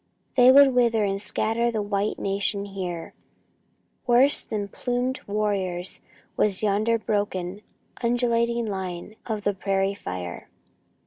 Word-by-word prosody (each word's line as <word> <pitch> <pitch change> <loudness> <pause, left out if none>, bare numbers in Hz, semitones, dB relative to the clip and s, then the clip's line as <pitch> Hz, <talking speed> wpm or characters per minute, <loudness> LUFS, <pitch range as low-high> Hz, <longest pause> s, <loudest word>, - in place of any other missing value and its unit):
They 250 0 +8
would 275 0 +7
wither 235 -3 +3
and 195 -1 -1
scatter 225 +3 0
the 220 -3 -1
white 205 0 -1
nation 200 +1 -1
here! 185 -4 -5 0.9
Worse 255 +4 +5
than 205 -2 -4
plumed 250 +5 -2
warriors 195 -4 -1 0.3
was 205 -1 +2
yonder 215 +3 +2
broken 205 -3 -2 0.4
undulating 235 -1 +1
line 190 -1 -5
of 215 -3 -3
the 205 - +1
prairie 195 0 0
fire. 90 - -6
205 Hz, 120 wpm, -25 LUFS, 195-235 Hz, 0.9 s, They